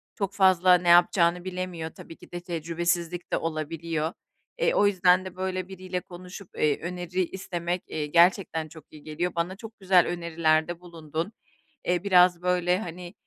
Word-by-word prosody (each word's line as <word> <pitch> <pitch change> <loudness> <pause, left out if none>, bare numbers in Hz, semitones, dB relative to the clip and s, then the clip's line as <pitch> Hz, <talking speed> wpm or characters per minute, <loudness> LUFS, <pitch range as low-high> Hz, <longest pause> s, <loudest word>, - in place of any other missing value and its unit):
çok 200 -2 -3
fazla 185 -2 +5
ne 175 0 0
yapacağını 175 0 +4
bilemiyor 180 -3 -4
tabii 165 - -12
ki - - -17
de 175 - -5
tecrübesizlik 170 0 -2
de - - +3
olabiliyor. 160 0 -3 0.5
Eee, 485 - +2
o 205 - +4
yüzden 185 -1 +3
de 185 - -8
böyle 185 0 -3
biriyle 185 -1 -5
konuşup, 180 +2 -11
eee, 150 -2 +2
öneri 180 +1 -2
istemek, 175 -1 -4
eee, 155 -1 -3
gerçekten 170 0 +3
çok 155 -1 -14
iyi 150 -1 -14
geliyor. 170 +3 -3
Bana 170 +2 -1
çok 225 +2 -12
güzel 185 -2 +4
önerilerde 170 -1 0
bulundun. 165 +2 -5 0.5
Eee, 175 0 0
biraz 180 -3 +5
böyle, 180 0 +1
hani, 175 -3 -8
175 Hz, 160 wpm, -26 LUFS, 165-185 Hz, 0.5 s, fazla